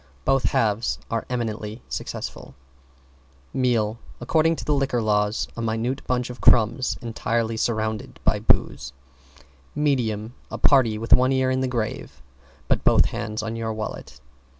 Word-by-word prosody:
Both 135 -1 +2
halves 110 +1 +1
are 115 -1 -2
eminently 110 -2 -4
successful. - - -6 1.0
=MEAL= 115 -4 +1 0.2
According 165 0 +2
to - - -7
the 150 - +2
Liquor 135 -3 +1
Law, 105 -2 +2 0.3
a 115 - -4
minute 115 +3 -1
bunch 125 -1 0
of 125 - -11
crumbs 120 +3 +4
entirely 115 0 -1
surrounded 110 -1 -2
by - - +2
booze. 70 -1 +1 0.8
=MEDIUM= 120 -7 0 0.2
A - - -5
party 125 -6 +4
with 115 +1 +2
one 130 +1 +5
ear 130 -1 +2
in 130 0 0
the 130 - +1
grave 115 - -4 0.5
but - - +1
both - - +5
hands 110 -1 -3
on 115 +1 -3
your 115 -1 -3
wallet. 110 0 -6
115 Hz, 145 wpm, -24 LUFS, 110-130 Hz, 1.0 s, one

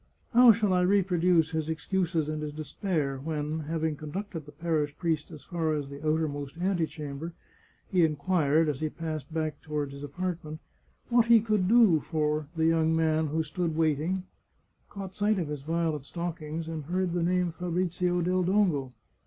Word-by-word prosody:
How 245 0 +9
shall 210 -3 +2
I 180 - +3
reproduce 180 -3 +3
his 160 -1 -2
excuses 165 0 -1
and 155 0 -3
his 150 -1 -4
despair 150 -2 -2
when, 150 +1 -3
having 160 0 -2
conducted 160 +1 -6
the - - -10
parish 150 -2 -1
priest 160 -4 -1
as 155 -5 -11
far 160 -2 -1
as 140 -2 -4
the 140 +2 -9
outermost 155 -2 -1
antechamber, 160 -4 -2 0.6
he 180 -2 +4
inquired, 155 0 +2
as 145 -3 -1
he 155 - -1
passed 155 -2 -5
back 155 -2 -2
toward 150 -2 -3
his 140 0 -9
apartment, 160 0 -4 0.5
what 240 -1 +4
he 230 -1 +8
could 210 -4 +1
do 220 -7 +6
for 150 -1 -1
the 160 0 +1
young 160 0 +3
man 160 -1 +2
who 160 +2 0
stood 165 +1 -2
waiting, 160 +4 +1 0.7
caught 195 -2 -7
sight 210 +1 +1
of 165 -5 -2
his 150 -2 -4
violet 160 -1 -1
stockings, 165 -1 -4
and 160 -3 -5
heard 180 +2 -1
the 175 - 0
name 180 0 +1
Fabrizio 180 +1 -1
del 185 +1 +1
Dongo? 175 -9 +1
160 Hz, 170 wpm, -28 LUFS, 150-180 Hz, 0.7 s, How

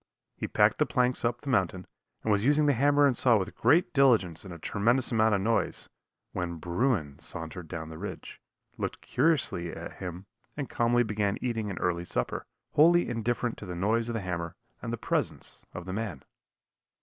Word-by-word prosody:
He - - -4
packed - - +3
the - - +3
planks 125 0 +1
up 120 0 0
the 140 - -6
mountain, 95 -5 +1 0.4
and 110 - +1
was 100 0 +2
using 150 +3 +4
the 145 - +4
hammer 145 +3 +4
and 135 -3 +3
saw 120 -2 +5
with 95 - -3
great 170 +4 +3
diligence 115 - +3
and 95 - -9
a 85 - -7
tremendous 120 +10 +1
amount 110 -2 +3
of 100 - 0
noise, 110 -2 0 0.4
when 90 -2 -3
bruin 85 - -1
sauntered 80 +2 -6
down 80 -2 -6
the 80 0 -9
ridge, - - -7 0.4
looked - - -3
curiously 125 - +1
at - - -8
him 90 +1 -6 0.3
and 145 -3 -3
calmly 120 +1 +3
began 105 -2 -1
eating 115 -4 -2
an 95 - -5
early 85 -1 0
supper, 60 -7 -2 0.2
wholly 170 +3 +5
indifferent 120 0 -1
to 100 - -8
the 90 - -5
noise 110 +6 +1
of 115 - -2
the 115 - -1
hammer 85 -3 -4 0.3
and - - -4
the - - -2
presence - - -2
of 90 - -7
the 95 - -5
man. 100 - -4
110 Hz, 190 wpm, -29 LUFS, 90-125 Hz, 0.4 s, saw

